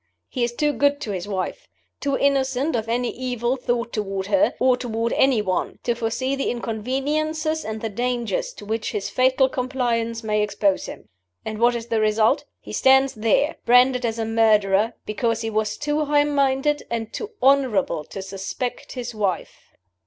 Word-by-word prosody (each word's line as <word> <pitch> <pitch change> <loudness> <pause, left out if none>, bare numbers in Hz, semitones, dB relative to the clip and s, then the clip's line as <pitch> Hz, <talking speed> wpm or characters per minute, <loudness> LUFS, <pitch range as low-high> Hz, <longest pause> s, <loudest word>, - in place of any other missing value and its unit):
He 250 - -2
is 240 - 0
too 295 +4 +1
good 285 +3 +2
to 220 - -3
his 185 -1 -4
wife, 190 -3 -4 0.3
too 280 -1 0
innocent 275 +1 +1
of 225 -1 -2
any 240 +1 0
evil 245 0 -2
thought 240 -2 -2
toward 195 -3 -2
her, 290 +9 +2
or 255 -1 +4
toward 230 -2 -2
any 255 -6 +3
one, 185 -2 -2
to 240 - +1
foresee 235 +4 -1
the 275 - -1
inconveniences 295 +8 -1
and 220 0 -5
the 225 - -2
dangers 250 - -2
to - - -11
which 220 +1 -2
his 200 - -3
fatal 260 +1 +3
compliance 240 -3 -1
may 210 -1 +1
expose 200 -2 0
him. - - -10 0.4
And 215 -1 -4
what 240 +1 +4
is 230 -1 -4
the 225 -1 +1
result? 215 +4 +2
He - - -10
stands 265 0 +4
there, 250 +8 +1
branded 250 +1 +5
as 230 -1 -1
a 225 - -1
murderer, 220 -1 +3
because 230 +1 -1
he 225 -1 -3
was 215 0 -1
too 295 +1 0
high 290 0 +3
minded 285 0 +1
and 225 -1 -3
too 435 +1 -5
honorable 250 - +2
to 195 - -7
suspect 195 +6 -5
his 245 -2 -5
wife." 200 -5 -3
240 Hz, 175 wpm, -23 LUFS, 220-265 Hz, 0.4 s, branded